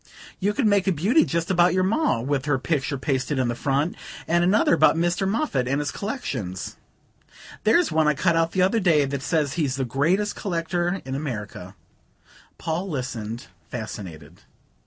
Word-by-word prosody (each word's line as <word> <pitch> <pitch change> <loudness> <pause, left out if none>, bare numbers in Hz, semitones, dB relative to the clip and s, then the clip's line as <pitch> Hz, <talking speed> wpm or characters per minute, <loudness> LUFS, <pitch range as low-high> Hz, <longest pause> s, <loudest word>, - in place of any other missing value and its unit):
You 205 +2 +1
could 265 - +1
make 200 -2 +3
a - - +4
beauty 200 - +3
just 170 -3 -1
about 175 0 +4
your 185 - +2
Ma, 205 - +1
with 135 +2 -1
her 145 -3 +2
picture 140 0 -1
pasted 135 0 -1
in 130 -2 +1
the - - 0
front 140 +6 0 0.3
and 170 +1 +3
another 190 +2 +3
about 165 - +5
Mr. 175 +3 0
Moffatt 200 - 0
and 140 +2 0
his 145 - -2
collections. 130 - -4 0.9
There's 325 +11 +4
one 155 -1 +3
I 150 - +3
cut 170 +3 +2
out 165 0 +2
the 185 - +3
other 195 +5 +2
day 160 -7 +3
that 140 0 -3
says 150 -2 0
he's 150 -6 0
the 135 -1 -1
greatest 170 - +1
collector 175 0 -2
in 130 - -5
America." 105 -9 -5 0.8
Paul 170 +4 -3
listened, 120 -5 -4 0.2
fascinated. 90 -7 -8
155 Hz, 175 wpm, -24 LUFS, 130-185 Hz, 0.9 s, about